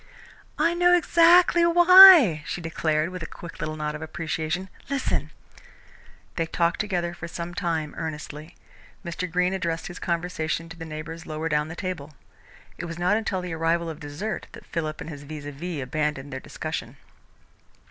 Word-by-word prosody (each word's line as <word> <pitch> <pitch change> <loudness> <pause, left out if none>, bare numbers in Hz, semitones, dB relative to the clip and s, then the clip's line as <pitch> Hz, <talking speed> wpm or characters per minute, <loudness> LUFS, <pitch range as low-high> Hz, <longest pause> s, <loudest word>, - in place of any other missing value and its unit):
"I 330 +3 +2
know 355 +1 +4
exactly 345 +1 +5
why," 345 - +9
she - - -3
declared, 160 -1 -1
with 185 -1 -7
a 165 - -5
quick 170 - -11
little 155 0 -3
nod 150 -1 -3
of 150 - -7
appreciation. 160 +3 -3 0.2
"Listen." 280 -2 -1 1.1
They 165 -1 0
talked 170 0 0
together 175 -5 -2
for 170 0 -8
some 170 +1 -6
time, 165 -5 -2
earnestly. 155 0 -7 0.5
Mr. 170 +1 -4
Greene 180 +2 +1
addressed 170 -3 -2
his 175 - -8
conversation 165 -1 -2
to 165 - -9
his 165 -1 -8
neighbours 160 +1 -7
lower 155 +1 -3
down 150 0 +1
the 160 - -8
table. 170 -5 -5 0.7
It 175 - -4
was 165 0 -6
not 180 +4 +2
until 215 -4 -1
the 180 -2 -5
arrival 165 +1 0
of 155 - -10
dessert 165 +7 -5
that - - -12
Philip 155 -2 -4
and - - -7
his 145 -2 -9
vis 145 0 -8
à 145 - -5
vis 160 0 -5
abandoned 145 0 -3
their 130 - -4
discussion. - - -6
165 Hz, 170 wpm, -25 LUFS, 155-185 Hz, 1.1 s, why